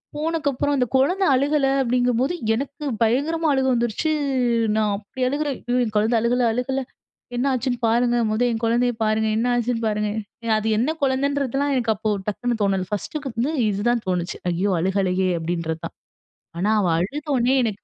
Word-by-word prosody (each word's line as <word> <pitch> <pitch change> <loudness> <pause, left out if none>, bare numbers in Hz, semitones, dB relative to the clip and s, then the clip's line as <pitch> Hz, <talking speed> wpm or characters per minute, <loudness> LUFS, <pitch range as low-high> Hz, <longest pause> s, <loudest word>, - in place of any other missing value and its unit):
போனக்கு 315 -1 -1
அப்புறம், 285 +3 -1
அந்த 250 - +2
குழந்தை 360 +9 +3
அழுகல, 280 +1 +2
அப்படிங்கும்போது 250 +4 +1 0.2
எனக்கு 280 +4 -5 0.2
பயங்கரமா 305 +8 +1
அழுக 265 -1 +1
வந்துருச்சு. 240 +6 0 0.6
நான் 215 -1 +1
அப்படி 215 +5 -10
அழுகுறேன். 285 0 -1
"ஐயோ! 245 +1 +1
என் 220 -2 -3
குழந்தை 220 +3 +2
அழுகல. 245 +2 +1
அழுகல. 265 +2 -1 0.6
என்னாச்சுன்னு 255 -1 0
பாருங்க. 240 +1 +2
மொத 215 +3 -1
என் 225 0 -3
குழந்தைய 240 +1 +2
பாருங்க. 215 0 +1
என்ன 245 +2 +1
ஆச்சுன்னு 235 -1 -1
பாருங்க." 210 0 0 0.5
அது 215 +1 -2
என்ன 300 +8 0
குழந்தைன்றதெல்லாம், 275 +1 0
எனக்கு 230 -3 +1
அப்போ 215 +2 -1 0.2
டக்குனு 240 +2 -2
தோணல. 190 -2 0
ஃபர்ஸ்ட்டுக்கு 270 +6 -4
வந்து 260 +7 0 0.2
இதுதான் 225 +4 0
தோணுச்சு. 180 -1 -2
"ஐயோ! 190 +4 0
அழுகலையே!" 190 0 +1
அப்டின்றது 165 -1 -3
தான். - - -8 0.6
ஆனா, 210 +4 +1
அவள் 170 -3 +2
அழுதோனே, 265 - 0
எனக்கு 210 -3 -3
240 Hz, 155 wpm, -22 LUFS, 215-270 Hz, 0.6 s, குழந்தை